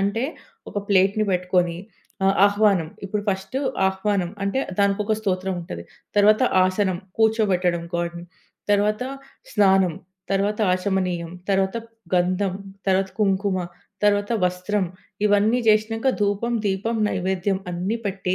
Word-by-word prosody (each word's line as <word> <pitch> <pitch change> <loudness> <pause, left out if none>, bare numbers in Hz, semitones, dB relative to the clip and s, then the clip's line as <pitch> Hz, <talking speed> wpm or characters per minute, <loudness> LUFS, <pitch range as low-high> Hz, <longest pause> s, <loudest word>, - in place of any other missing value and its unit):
అంటే 205 +5 0 0.5
ఒక - - -12
ప్లేట్‌ని 200 +2 +3
పెట్టుకొని, 180 -1 +1 0.5
ఆహ్, 195 0 +3
ఆహ్వానం. 200 -5 +2 0.2
ఇప్పుడు 205 +1 -2
ఫస్టు 190 +7 -3 0.3
ఆహ్వానం. 190 -2 -1
అంటే 200 +6 0 0.2
దానికొక 200 +2 +1
స్తోత్రం 190 -2 -1
ఉంటది. 85 - -7 0.3
తరువాత 215 +3 +5 0.2
ఆసనం, 185 -1 0 0.2
కూర్చోబెట్టడం 195 -6 +2
గాడ్‌ని. 170 0 -3 0.5
తర్వాత 210 +2 +2 0.5
స్నానం, 190 -3 +4 0.4
తరువాత 200 +2 0
ఆచమనీయం, 185 -2 -1 0.2
తరువాత 195 +2 +1 0.4
గంధం, 185 +2 +1 0.3
తరువాత 190 0 +2
కుంకుమ, 195 -1 +1 0.5
తరువాత 205 +1 +2
వస్త్రం. 180 +2 0 0.4
ఇవన్నీ 210 +3 +3
జేసినంక 220 +3 +2
ధూపం, 205 +3 0
దీపం, 200 +4 -1
నైవేద్యం 190 0 -1
అన్ని 180 +6 -2
పెట్టి, 190 -2 -1
195 Hz, 110 wpm, -23 LUFS, 185-210 Hz, 0.5 s, తరువాత